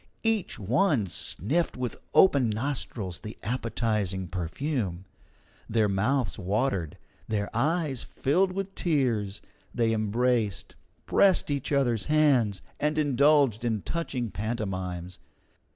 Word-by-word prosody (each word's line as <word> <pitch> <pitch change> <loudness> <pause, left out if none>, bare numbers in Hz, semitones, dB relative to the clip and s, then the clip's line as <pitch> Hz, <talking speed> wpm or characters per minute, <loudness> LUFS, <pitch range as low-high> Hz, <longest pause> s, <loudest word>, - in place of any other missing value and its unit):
Each 225 -4 0
one 125 - +2
sniffed 130 - -2
with 125 -2 -3 0.2
open 140 -10 +5
nostrils 110 -6 -2
the 110 - -8
appetizing 105 -5 -1
perfume. 95 - -3 0.6
Their 110 -1 +2
mouths 110 +3 0
watered, 100 - -1 0.3
their 105 -2 -2
eyes 150 0 0
filled 180 +8 +1
with 195 +1 -4
tears, 120 - 0 0.3
they 115 -2 +2
embraced, 110 -1 0 0.3
pressed 190 -6 +4
each 140 -1 -2
other's 125 -6 +2
hands, 135 -10 +3 0.2
and 150 +1 0
indulged 140 -5 +3
in 110 -4 -1
touching 130 -9 -3
pantomimes. 95 -4 -4
115 Hz, 105 wpm, -27 LUFS, 100-145 Hz, 0.6 s, open